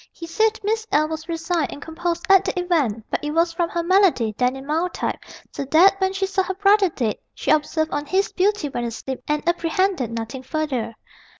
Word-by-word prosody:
He 335 - -9
said 440 +6 +1
Miss 440 +2 -1
L. 305 +1 +3
was 320 +1 -6
resigned 330 -2 -1
and - - -8
composed 335 +2 -3
at 390 -1 +6
the 360 - -2
event, 285 - 0
but - - -2
it 295 - -2
was 335 0 +2
from 335 0 -1
her 340 - -2
malady, 345 - +3
then 250 +2 +1
in 270 0 -9
mild 325 +5 -1
type, - - -2 0.3
so - - -4
that 370 +7 +5
when 380 0 +2
she 390 0 -1
saw 385 0 0
her 380 0 -3
brother 400 0 +4
dead, 235 -9 -2 0.2
she - - -1
observed 315 +1 +1
on 290 0 -3
his 390 +5 +1
beauty 395 -3 +1
when 240 -3 -4
asleep 245 +3 -5
and 300 +2 -1
apprehended 345 - +1
nothing 230 +3 -5
further. 260 -6 -3
330 Hz, 210 wpm, -22 LUFS, 280-380 Hz, 0.3 s, at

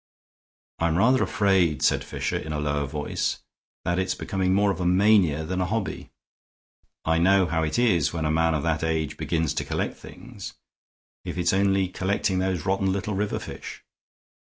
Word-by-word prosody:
"I'm 85 0 +1
rather 125 +6 +4
afraid," 95 -8 +2
said - - +3
Fisher, - - -3
in 80 - -6
a 75 - -2
lower 75 -1 -1
voice, 75 +1 -2 0.5
"that 85 +1 0
it's 95 - -1
becoming 95 -1 -1
more 100 +1 +3
of 90 - -5
a - - -1
mania 90 -5 +4
than 90 +4 -2
a - - +1
hobby. 110 +1 -3 1.0
I 80 +1 +2
know 95 +2 +4
how 80 -1 -1
it 80 -1 -1
is 105 - +3
when 80 -2 -3
a 75 - +1
man 80 0 +2
of 75 - -2
that 80 -1 0
age 80 -2 -1
begins 80 -4 -1
to - - -2
collect - - -2
things, - - -10 0.7
if - - -6
it's 90 0 +1
only 95 -1 +2
collecting 95 +1 -1
those 95 -4 -1
rotten 95 0 +1
little 100 +2 -2
river 100 +2 -1
fish. - - -8
90 Hz, 180 wpm, -25 LUFS, 80-95 Hz, 1.0 s, rather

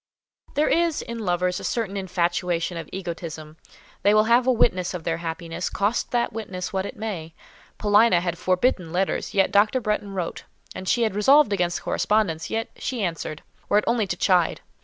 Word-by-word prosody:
There 300 - +3
is, 335 -2 +1
in 235 0 -6
lovers, 180 -2 0
a - - -9
certain 220 -4 -2
infatuation 180 -2 -1
of 165 -2 -6
egotism; 165 -4 -6 0.4
they 205 +1 +4
will 215 - +6
have 240 +3 +3
a - - +6
witness 185 -7 +1
of 175 - -6
their 165 0 -1
happiness, 170 +1 -4
cost 205 +4 0
that 240 -1 0
witness 195 -5 -5
what 190 +1 -1
it - - -9
may. 175 -7 -5 0.4
Paulina 210 -2 +4
had 175 -1 -2
forbidden 185 -2 +1
letters, 185 +3 -1
yet 195 -1 +3
Dr. 215 +4 +4
Bretton 210 -3 -2
wrote; 180 -3 -4 0.4
she 235 +5 +2
had 220 - 0
resolved 240 +3 +5
against 175 -3 -1
correspondence, 200 -7 0
yet 225 0 -2
she 245 -5 -3
answered, 165 -3 -4 0.3
were 205 - +4
it 210 - +3
only 230 -3 +1
to 180 - -3
chide. 180 -3 +2
190 Hz, 180 wpm, -24 LUFS, 175-220 Hz, 0.4 s, will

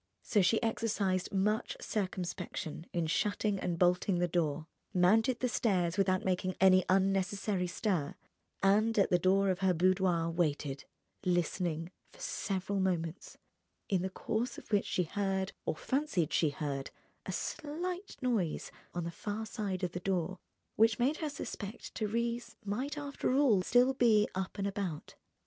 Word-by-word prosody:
So 210 - +3
she 220 +5 +3
exercised 210 -5 0
much 210 +3 0
circumspection 180 -5 -4
in 170 -2 0
shutting 205 +4 0
and 175 -2 -2
bolting 180 +1 +3
the 175 0 +2
door, 160 -3 0 0.3
mounted 220 +7 +4
the 255 - +2
stairs 185 -7 +1
without 185 -2 +2
making 185 0 0
any 185 -1 +6
unnecessary 195 0 +1
stir, 175 -5 -1 0.5
and 215 +3 +4
at 200 - +3
the 180 - +4
door 195 +2 +3
of 185 - -2
her 190 -2 +2
boudoir 180 -1 +2
waited, 150 -4 -1 0.4
listening, 175 -2 0 0.2
for - - -19
several 195 - -2
moments, 175 -2 -2 0.5
in 190 -3 +2
the 190 - -1
course 220 +5 -2
of - - -12
which 205 -1 +3
she 180 - +1
heard, 190 +2 -1
or - - 0
fancied 225 - 0
she 160 - +3
heard, 145 -2 -3 0.4
a - - -2
slight 355 +6 -4
noise 220 -10 0 0.2
on 175 - -1
the 170 - -4
far 210 +5 -4
side 205 -5 -3
of 180 - 0
the 180 - -4
door 185 -1 -1 0.4
which 220 0 +5
made 270 +5 +2
her 310 - -2
suspect 215 -6 -6
Thérèse 235 +2 -2
might 255 +9 -2
after 285 -3 -2
all 260 -9 +5
still 245 +7 +4
be 225 -5 +4
up 190 +2 -3
and 200 - -1
about. 195 -6 -4
190 Hz, 155 wpm, -32 LUFS, 180-220 Hz, 0.5 s, any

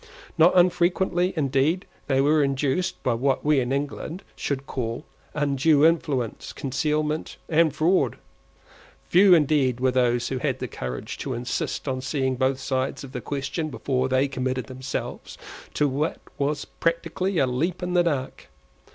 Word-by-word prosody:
Not 165 +1 +5
unfrequently, 180 +1 +3
indeed, 145 +4 +1 0.2
they 135 -1 +3
were 150 +2 +4
induced, 140 +6 -1
by 125 - +2
what 135 +5 0
we 150 -2 +4
in 125 0 -1
England 145 +6 -3
should 140 -1 -3
call 120 +2 -4 0.3
undue 145 +1 +3
influence, 145 -8 0
concealment, 150 +3 -1
and 165 -1 +3
fraud. 175 +5 +2 0.9
Few 185 +1 +7
indeed 140 -5 +2
were 130 0 +2
those 120 -1 +1
who 130 - -2
had - - -1
the - - -4
courage 65 0 -6
to - - -3
insist 120 +4 -3
on 130 -1 -1
seeing 130 -1 -1
both 130 +1 +1
sides 130 +1 -2
of 135 - -9
the 125 -2 -5
question 145 +4 -3
before 130 -2 -1
they 130 +2 +2
committed 130 -2 -2
themselves 130 +2 -6 0.4
to 150 - +3
what 145 +4 -1 0.2
was 145 +1 -1
practically 170 +3 -1
a 140 - +4
leap 160 +9 -1
in 180 0 -2
the 175 - +5
dark. 145 -6 -2
140 Hz, 150 wpm, -25 LUFS, 130-160 Hz, 0.9 s, Few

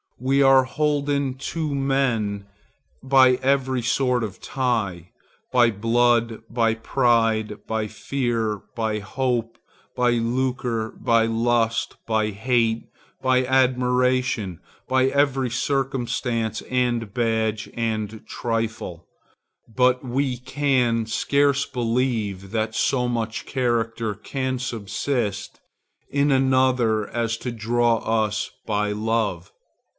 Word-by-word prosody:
We 135 +3 +2
are 135 -1 +6
holden 145 -2 0 0.2
to 155 -3 -2
men 125 -7 0 0.6
by 130 -1 +5
every 130 -1 +1
sort 125 0 +1
of 100 -4 -6
tie, 110 -10 -2 0.4
by 120 -2 +4
blood, 115 +1 +2
by 115 -1 +1
pride, 115 -3 +1
by 110 -1 -1
fear, 115 -3 -2
by 110 -2 -1
hope, 120 +2 -2 0.4
by 125 -1 +2
lucre, 120 -1 -1
by 115 -1 +2
lust, 115 0 0
by 110 -1 +1
hate, 115 +1 0 0.4
by 130 -1 +2
admiration, 125 -6 +1 0.3
by 130 0 +3
every 135 -2 +1
circumstance 125 -3 -1
and 120 -4 -1
badge 110 -2 0
and 110 -2 -3
trifle,—but 115 +3 -3
we 130 0 -1
can 125 -3 +1
scarce 140 +4 +2
believe 115 -6 -1
that 110 -1 -1
so 125 0 +1
much 115 -2 -3
character 115 -3 -1
can 130 +5 -3
subsist 115 -2 -3 0.5
in 140 0 +2
another 130 -5 +2
as 115 -1 -1
to 125 - -4
draw 115 +1 +1
us 110 -1 -1 0.2
by 105 -1 0
love. 105 -4 -1
120 Hz, 100 wpm, -23 LUFS, 110-130 Hz, 0.6 s, are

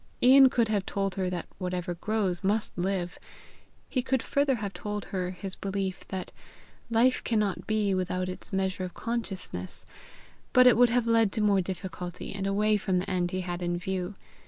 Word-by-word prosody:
Ian 265 +1 +8
could 235 -2 +2
have 205 -3 +1
told 195 0 -2
her 185 -1 -1
that 180 -2 -3
whatever 180 -1 -2
grows 195 -1 -1
must 210 +3 0
live; 180 0 -2 0.7
he 255 - 0
could 260 -1 0
further 280 -1 +2
have 205 -4 -4
told 210 0 -4
her 180 -1 -1
his 185 +1 -5
belief 195 -1 -3
that 190 -2 -5 0.6
life 235 +3 +3
cannot 210 -5 0
be 215 -2 +1
without 185 0 -1
its 185 - -8
measure 190 -1 -1
of 180 -1 -6
consciousness; 195 - -4 0.7
but 255 0 +7
it 250 - +8
would 245 +1 +6
have 240 0 +2
led 230 -3 +3
to 220 - 0
more 200 -2 +4
difficulty, 180 -1 -6
and 195 0 -3
away 210 +2 +3
from 190 -3 0
the 180 - -1
end 180 -2 0
he 185 +1 -2
had 175 0 -4
in 175 0 -1
view. 185 +2 -3
195 Hz, 180 wpm, -28 LUFS, 185-220 Hz, 0.7 s, Ian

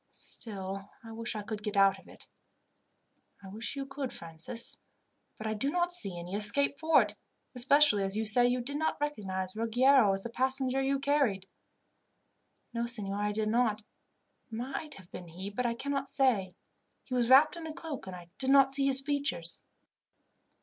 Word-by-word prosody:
Still, 195 -2 -6
I 225 - -10
wish 230 +1 -4
I 210 - -4
could 210 0 -6
get 210 -1 -4
out 195 0 +4
of - - -20
it." - - -13 1.2
"I 190 - -10
wish 220 +7 -4
you 275 -1 -4
could, 270 -1 -5
Francis, 165 +8 -3 0.6
but 215 - -8
I 215 - -1
do 245 +6 -2
not 350 +2 0
see 200 - +2
any 175 +2 -8
escape 245 +8 +2
for 320 0 +4
it, - - -8 0.4
especially 265 -3 +4
as 195 +1 -2
you 220 - -1
say 245 +3 +6
you 250 0 0
did 285 +4 -3
not 315 +1 -1
recognize 190 -10 -3
Ruggiero 235 +1 +4
as 195 0 -4
the 235 - -6
passenger 260 +1 0
you 275 +1 0
carried." 275 -9 0 1.3
"No, 235 0 -2
signor, 205 -4 -2
I 210 0 0
did 215 0 -1
not. 220 -2 +1 0.7
It - - -42
might 270 +6 -5
have 185 -3 -15
been 175 - -9
he, 185 +5 -7
but 245 +4 -1
I 235 - -2
cannot 275 +2 -3
say. 210 -9 +1 0.5
He 255 - -8
was 245 -1 +1
wrapped 280 +6 +6
in 330 -1 -7
a - - -5
cloak, 310 - -7
and 185 - -7
I 175 -1 -12
did 265 - 0
not 270 -1 +5
see 275 0 +2
his 270 0 +5
features." 280 - 0
235 Hz, 185 wpm, -30 LUFS, 200-275 Hz, 1.3 s, say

